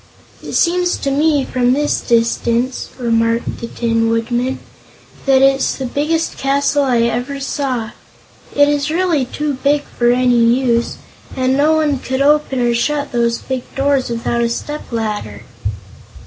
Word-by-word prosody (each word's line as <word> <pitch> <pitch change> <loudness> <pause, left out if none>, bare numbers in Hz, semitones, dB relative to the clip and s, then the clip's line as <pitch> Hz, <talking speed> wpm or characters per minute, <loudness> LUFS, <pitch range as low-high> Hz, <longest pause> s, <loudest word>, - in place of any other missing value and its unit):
"It - - -8
seems 355 +1 +2
to 275 - -2
me, 290 -1 +2
from 250 0 +1
this 295 +2 0
distance," 235 +2 0
remarked 230 -1 0
the 235 - -5
Tin 230 -1 0
Woodman, 240 +3 -1 0.7
"that 270 -1 +5
it's 270 0 +3
the 265 - -4
biggest 305 +6 -1
castle 280 +1 +1
I 250 -4 +2
ever 245 +4 -1
saw. 260 -5 -2 0.6
It 285 0 +5
is 290 0 0
really 330 -4 +1
too 295 +3 -3
big 290 +1 +2
for 240 -3 0
any 245 -1 +3
use, 235 0 +1 0.4
and 260 0 +1
no 295 +3 +3
one 300 -4 +1
could 260 +1 -1
open 295 -2 +2
or 240 -1 +2
shut 290 +5 -1
those 235 -1 +1
big 260 -1 -4
doors 275 -1 +1
without 235 0 -1
a 235 - +1
stepladder." 225 - -4
260 Hz, 150 wpm, -17 LUFS, 235-285 Hz, 0.7 s, that